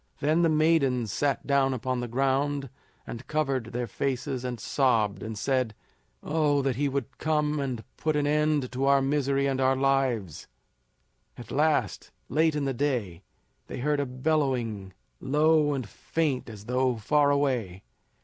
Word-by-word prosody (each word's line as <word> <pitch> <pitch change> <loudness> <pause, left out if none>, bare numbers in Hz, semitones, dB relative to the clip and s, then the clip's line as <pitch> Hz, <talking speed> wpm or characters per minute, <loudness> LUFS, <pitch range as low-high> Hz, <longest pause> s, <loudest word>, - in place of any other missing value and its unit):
Then 155 +4 +2
the 165 - +4
maidens 150 -8 +2
sat 145 -1 0
down 135 -2 +2
upon 130 +1 -2
the 120 - -3
ground 135 +2 0 0.3
and 115 - -8
covered 135 -6 0
their 120 +2 -3
faces 130 +2 -3
and 125 -2 -4
sobbed, 110 -5 +1
and 110 -1 -5
said: 125 -2 0 0.5
"Oh, 150 -2 +1
that 135 -2 0
he 145 +3 0
would 135 -1 -4
come 150 -1 0
and 130 -5 -3
put 155 -1 0
an 145 -1 +1
end 150 -2 +1
to 130 +2 -1
our 140 0 +5
misery 140 0 +1
and 135 -1 0
our 130 0 +3
lives." 130 - 0 0.9
At 120 - -10
last, 150 -7 0 0.2
late 160 +2 +2
in 145 -2 -1
the 135 - -1
day, 120 - -2 0.5
they - - -6
heard 145 +3 0
a 140 - -1
bellowing, 125 -8 -1 0.3
low 150 +1 +3
and 130 -5 -4
faint 140 +3 -2
as 105 -2 -10
though 125 +1 +1
far 145 +6 +2
away. 125 -10 0
135 Hz, 160 wpm, -27 LUFS, 125-145 Hz, 0.9 s, our